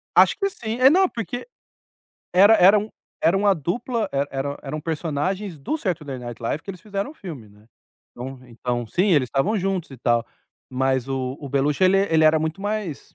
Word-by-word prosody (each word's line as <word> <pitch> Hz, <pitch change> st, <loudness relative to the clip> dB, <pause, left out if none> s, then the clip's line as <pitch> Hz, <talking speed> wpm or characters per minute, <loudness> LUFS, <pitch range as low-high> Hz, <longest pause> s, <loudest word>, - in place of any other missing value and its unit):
Acho -, -, +6 dB
que 395 Hz, -1 st, 0 dB
sim. 230 Hz, -, -5 dB
É, 260 Hz, +1 st, +8 dB
não, 370 Hz, +3 st, +4 dB
porque 240 Hz, -, -5 dB, 0.9 s
era 200 Hz, +5 st, +7 dB
era 200 Hz, 0 st, +7 dB
um 210 Hz, +1 st, -4 dB, 0.4 s
era 170 Hz, +4 st, +4 dB
uma 200 Hz, 0 st, +3 dB
dupla 220 Hz, -, -2 dB
e -, -, -3 dB
era 140 Hz, +1 st, -3 dB
eram 150 Hz, +2 st, -5 dB
personagens 165 Hz, +4 st, -3 dB
do 140 Hz, -, -2 dB
Saturday 150 Hz, -, -3 dB
Night 120 Hz, -1 st, -8 dB
Live 145 Hz, +6 st, -2 dB
que 195 Hz, -, -7 dB
eles 180 Hz, -3 st, -10 dB
fizeram 200 Hz, +4 st, -4 dB
o -, -, -14 dB
filme, 155 Hz, -, -9 dB
né. 105 Hz, +1 st, -21 dB, 0.5 s
Então 130 Hz, +1 st, -8 dB
então, 120 Hz, 0 st, -3 dB
sim, 185 Hz, -, +1 dB
eles 145 Hz, -6 st, +3 dB
estavam 190 Hz, -, +1 dB
juntos 190 Hz, -3 st, -2 dB
e 135 Hz, -, -10 dB
tal. 120 Hz, -1 st, +1 dB, 0.5 s
Mas 130 Hz, 0 st, 0 dB
o 130 Hz, -1 st, -2 dB
o 140 Hz, -, -7 dB
Beluchio, 140 Hz, +6 st, +1 dB
ele 185 Hz, +1 st, +5 dB, 0.2 s
ele 160 Hz, -1 st, +5 dB
era 155 Hz, 0 st, +5 dB
muito 160 Hz, +5 st, -3 dB
mais, 205 Hz, -7 st, -4 dB
160 Hz, 195 wpm, -23 LUFS, 135-200 Hz, 0.9 s, É